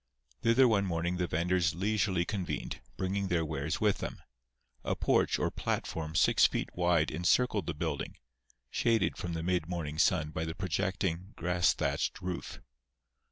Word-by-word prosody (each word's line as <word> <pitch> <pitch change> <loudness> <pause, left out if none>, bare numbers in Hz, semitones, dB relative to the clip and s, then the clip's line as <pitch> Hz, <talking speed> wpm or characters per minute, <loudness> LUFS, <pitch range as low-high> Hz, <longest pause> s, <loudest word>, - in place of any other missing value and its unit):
Thither 120 +3 +5
one 100 -4 +2
morning 85 +1 -1
the 90 -1 0
venders 85 +1 +1
leisurely 95 -2 +1
convened, 95 -2 -4 0.2
bringing 95 +1 -1
their 85 -2 +1
wares 75 0 -2
with 105 -2 +2
them. - - -5 0.6
A - - -1
porch - - +2
or - - 0
platform 80 -1 -3
six - - +5
feet - - -3
wide 85 -3 +2
encircled 95 +3 +2
the 85 - -2
building, 80 -2 -3 0.6
shaded 115 -4 +2
from 85 -1 -4
the 80 0 -3
mid 90 -2 0
morning 80 -4 -3
sun 75 -2 +3
by 80 - -3
the 80 0 -4
projecting, 95 +1 -2
grass 90 0 +2
thatched - - -1
roof. 90 -1 -5
90 Hz, 155 wpm, -31 LUFS, 80-95 Hz, 0.6 s, Thither